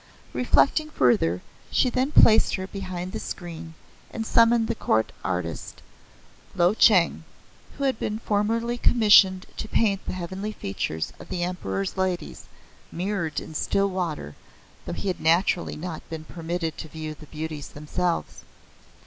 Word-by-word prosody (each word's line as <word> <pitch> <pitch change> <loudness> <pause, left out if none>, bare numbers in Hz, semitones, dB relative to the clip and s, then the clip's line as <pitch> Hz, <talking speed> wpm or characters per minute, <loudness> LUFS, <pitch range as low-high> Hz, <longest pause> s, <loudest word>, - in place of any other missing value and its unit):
Reflecting 295 +4 +3
further 90 - +2 0.3
she - - +3
then 255 +3 0
placed 220 -6 +6
her 190 - -4
behind 185 -2 -5
the - - -4
screen, 165 -2 -7 0.3
and 225 - -4
summoned 230 0 +4
the 230 - 0
court 110 - +1
artist, 90 -3 -4 0.7
Lo 175 +2 +4
Cheng, 190 -7 +4 0.5
who 280 - -3
had 265 -4 +1
been 210 - -2
formerly 230 +3 0
commissioned 205 -6 +5
to - - -4
paint 200 -3 +1
the - - -2
heavenly 190 +4 -4
features 80 - -3
of - - -12
the 175 - -2
Emperor's 100 - -3
Ladies, 185 -2 -2 0.5
mirrored 175 -3 -2
in - - -9
still 195 +5 +1
water, 165 - -3 0.5
though - - -3
he - - -4
had 185 - -1
naturally 170 +2 +2
not 160 0 -6
been 160 -1 -6
permitted 165 0 -4
to 160 - -6
view 155 0 -6
the 155 0 -14
beauties 155 -1 -6
themselves. 170 +4 -3
180 Hz, 145 wpm, -25 LUFS, 160-210 Hz, 0.7 s, placed